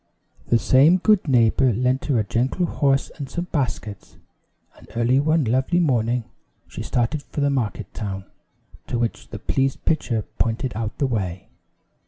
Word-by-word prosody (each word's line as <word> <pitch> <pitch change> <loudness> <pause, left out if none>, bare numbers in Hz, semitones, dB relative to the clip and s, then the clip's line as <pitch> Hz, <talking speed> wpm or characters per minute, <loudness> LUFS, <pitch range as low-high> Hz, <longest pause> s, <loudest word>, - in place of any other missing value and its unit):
The 120 - +4
same 140 +9 +5
good 200 -1 +3
neighbor 125 0 +4
lent 125 +4 0
her 140 -5 +1
a 110 - +2
gentle 130 - 0
horse 140 -4 +1
and 140 - -5
some 175 +1 -3
baskets; 115 - -3 0.6
and - - -17
early 120 +3 +3
one 155 +2 +2
lovely 130 +8 +1
morning, 125 -6 +1 0.4
she - - -8
started 125 +5 -1
for 145 - -7
the 140 0 +2
market 125 -6 -2
town, 95 -3 -5 0.6
to 120 - -2
which 115 -1 -2
the 110 - -6
pleased 135 +5 -1
pitcher 120 -8 0 0.2
pointed 115 +3 -1
out 110 -1 -4
the 140 - +1
way. 95 -8 -3
125 Hz, 160 wpm, -23 LUFS, 115-140 Hz, 0.6 s, same